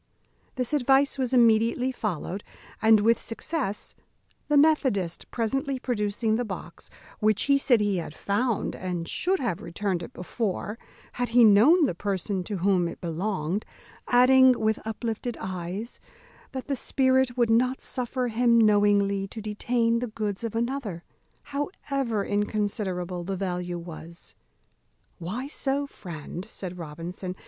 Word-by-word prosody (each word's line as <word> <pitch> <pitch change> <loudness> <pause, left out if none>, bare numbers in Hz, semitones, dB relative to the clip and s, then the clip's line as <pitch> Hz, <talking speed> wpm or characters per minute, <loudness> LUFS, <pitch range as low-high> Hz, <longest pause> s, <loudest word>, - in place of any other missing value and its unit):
This 250 +1 -2
advice 275 0 +3
was 255 -2 0
immediately 235 +1 +4
followed, 200 - -4 0.4
and 220 -1 +6
with 230 +2 +3
success, 230 -3 -3 0.5
the 295 - +3
methodist 260 - +2
presently 270 +4 -1
producing 220 -2 -1
the 245 - 0
box, 185 -5 -8 0.3
which, 215 -1 +3
he 280 0 +3
said, 245 -5 +3
he 205 -2 +1
had 165 -3 -4
found, 215 +2 -1
and 175 -2 -4
should 375 - +1
have 220 - -2
returned 185 -1 -2
it 170 - -8
before, 210 +3 -3 0.3
had 245 -1 -2
he 240 +1 +6
known 240 - +7
the 260 - 0
person 190 0 -2
to 205 0 -3
whom 180 -1 +2
it - - -7
belonged; 175 +2 -2 0.4
adding, 255 0 +6
with 220 0 +1
uplifted 225 +1 -3
eyes, 185 +5 -5 0.5
that 260 -1 -5
the 280 - -1
spirit 260 -1 +1
would 235 -2 +3
not 250 +3 +3
suffer 250 0 -2
him 235 +1 +3
knowingly 205 -2 +3
to 220 - -8
detain 230 +2 0
the 245 - -2
goods 215 -2 -4
of 230 -1 -3
another, 230 -7 -2 0.4
however 275 - -2
inconsiderable 200 -4 -2
the 190 +2 -3
value 180 -2 -3
was. 170 0 -10 0.9
"Why 200 +10 -4
so, 280 0 -1
friend?" 175 - -8
said 180 -4 -7
Robinson. 170 +4 -6
215 Hz, 140 wpm, -26 LUFS, 190-250 Hz, 0.9 s, known